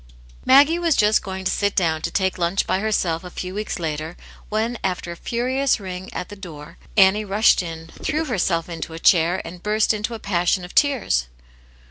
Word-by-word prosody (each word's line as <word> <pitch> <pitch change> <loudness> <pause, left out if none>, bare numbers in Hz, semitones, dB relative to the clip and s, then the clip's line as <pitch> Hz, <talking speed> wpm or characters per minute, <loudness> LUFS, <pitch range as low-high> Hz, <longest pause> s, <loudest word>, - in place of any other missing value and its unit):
MAGGIE 290 +6 +6
was 335 -4 +2
just 210 0 +3
going 190 -1 -6
to 185 - +1
sit 200 -1 0
down 160 -4 +1
to - - -2
take 190 +1 -1
lunch 175 +3 +1
by 190 - 0
herself 185 -6 0
a 180 - -8
few 180 +1 -6
weeks 210 +2 -3
later, 160 0 -4 0.3
when, 220 +2 -1
after 180 -2 -2
a - - -6
furious 255 +7 0
ring 185 -1 -7
at 180 - -5
the 205 - -8
door, 160 -6 -11 0.2
Annie 195 +2 +5
rushed 210 +1 +3
in, 165 -2 -7 0.2
threw 315 +2 -1
herself 180 - 0
into 165 -1 -6
a 165 - -7
chair, 170 +1 +3
and 175 +1 -9
burst 215 +2 +2
into 215 +2 -3
a - - -8
passion 180 -2 0
of 180 - -12
tears. 245 - +2
190 Hz, 195 wpm, -22 LUFS, 170-215 Hz, 0.3 s, MAGGIE